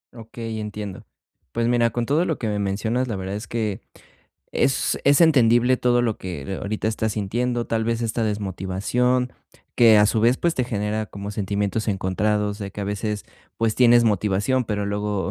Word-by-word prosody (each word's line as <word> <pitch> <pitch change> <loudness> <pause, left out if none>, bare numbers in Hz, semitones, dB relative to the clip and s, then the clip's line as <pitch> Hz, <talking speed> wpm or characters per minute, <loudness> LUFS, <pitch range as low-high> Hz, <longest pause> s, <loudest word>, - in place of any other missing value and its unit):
Okey, 115 -1 -7
entiendo. 105 -2 -6 0.5
Pues, 115 0 0
mira, 120 -1 +3
con 120 +1 -2
todo 155 +7 +2
lo 160 - -1
que 115 - -3
me 105 -1 -1
mencionas, 110 +6 -1
la 110 - -3
verdad 95 +1 -4
es 105 - -6
que 110 -4 -2 0.7
es 135 - +1
es 140 +2 +5
entendible 125 -5 +5
todo 120 -1 +2
lo 115 -3 0
que 90 0 -5
ahorita 110 +1 -2
estás 110 0 -1
sintiendo, 120 +4 -1
tal 110 -1 -1
vez, 115 0 -1
esta 115 0 -1
desmotivación 105 +5 -1 0.4
que, 115 -3 +7
a 105 - +6
su 110 +1 +1
vez, 120 +3 +4
pues, 170 -1 +1
te 125 - 0
genera 110 -1 -2
como 100 +1 -7
sentimientos 100 +2 -2
encontrados 105 +2 0
de 100 -2 -5
que 100 - -8
a - - -2
veces, 105 +1 -3 0.3
pues, 115 -1 +1
tienes 120 -1 +5
motivación, 105 +5 +1
pero 105 -2 -2
luego 105 -1 -2
110 Hz, 180 wpm, -23 LUFS, 100-120 Hz, 0.7 s, que